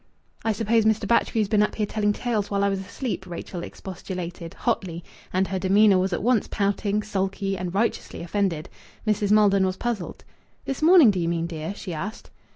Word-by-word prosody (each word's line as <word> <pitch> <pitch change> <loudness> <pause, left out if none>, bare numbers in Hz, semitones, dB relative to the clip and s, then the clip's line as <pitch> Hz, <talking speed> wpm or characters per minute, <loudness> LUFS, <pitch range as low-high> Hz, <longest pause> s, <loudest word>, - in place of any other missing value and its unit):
"I 225 - +2
suppose 225 +1 +2
Mr. 220 -1 +2
Batchgrew's 225 -1 +2
been 210 0 +3
up 210 - +1
here 215 - 0
telling 210 0 0
tales 215 -2 -1
while 200 -1 0
I 200 - +3
was 195 -1 -1
asleep," 195 0 -5
Rachel 175 0 -6
expostulated, 180 -2 -7
hotly 180 -8 -2 0.3
and 185 +1 +1
her 190 -1 -1
demeanour 195 +1 +5
was 190 +1 0
at 175 - -2
once 240 -2 +2
pouting, 205 +1 0
sulky, 195 -1 -2
and 180 -1 -4
righteously 200 -2 -1
offended. 175 -3 -1 0.4
Mrs. 210 -1 +1
Maldon 205 -2 +5
was 185 0 0
puzzled. 235 -7 -4 0.4
"This 270 - -3
morning, 320 - +7
do 190 - -2
you 170 -1 0
mean, 170 -1 -1
dear?" 165 +3 -5
she 185 -3 -6
asked. 195 +8 -6
200 Hz, 185 wpm, -25 LUFS, 185-215 Hz, 0.4 s, morning